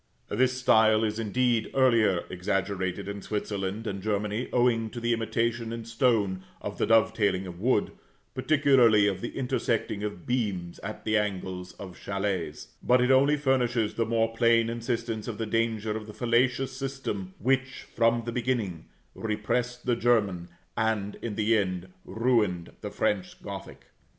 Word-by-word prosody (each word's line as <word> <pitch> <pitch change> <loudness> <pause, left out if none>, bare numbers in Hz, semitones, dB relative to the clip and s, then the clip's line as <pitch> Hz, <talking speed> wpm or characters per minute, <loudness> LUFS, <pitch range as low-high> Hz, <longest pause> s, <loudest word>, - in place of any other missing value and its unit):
This 130 +4 +1
style 110 -3 +4
is, 110 0 -1
indeed, 115 +1 +1
earlier 115 -9 +4
exaggerated 95 +1 -2
in 100 0 -5
Switzerland 100 0 -3
and 100 -3 -4
Germany, 105 +3 -1
owing 120 -2 +2
to 120 - -7
the 120 0 +1
imitation 115 0 -1
in 115 -1 -5
stone 115 -5 +1 0.2
of - - -6
the - - +1
dovetailing 110 -4 +3
of 90 -1 -8
wood, 115 0 +1 0.4
particularly 135 -8 +4
of 95 -2 0
the 120 - -5
intersecting 115 -5 -1
of 105 -5 -5
beams 100 -9 -2
at 110 +2 -7
the 110 0 +3
angles 95 -3 -4
of 95 -3 -10
châlets; 95 -10 -3
but 125 +1 +4
it 125 +1 +3
only 140 +3 +5
furnishes 125 -5 +1
the 115 - 0
more 115 0 +1
plain 115 -1 +3
instance 115 -2 -3
of 115 -3 -4
the 115 - -2
danger 110 -1 0
of 110 -1 -6
the 105 - -10
fallacious 125 +2 +1
system 130 -9 -4
which, 135 +2 0
from 115 0 +3
the 120 - -3
beginning, 115 -9 -2 0.3
repressed 120 +3 -2
the 125 -2 +2
German, 100 -8 +1 0.3
and, 110 -2 0
in 110 -3 -4
the 110 +2 +2
end, 95 -3 -1 0.2
ruined 110 -8 +1
the - - -4
French 95 -3 -1
Gothic. - - -8
110 Hz, 155 wpm, -27 LUFS, 100-120 Hz, 0.4 s, only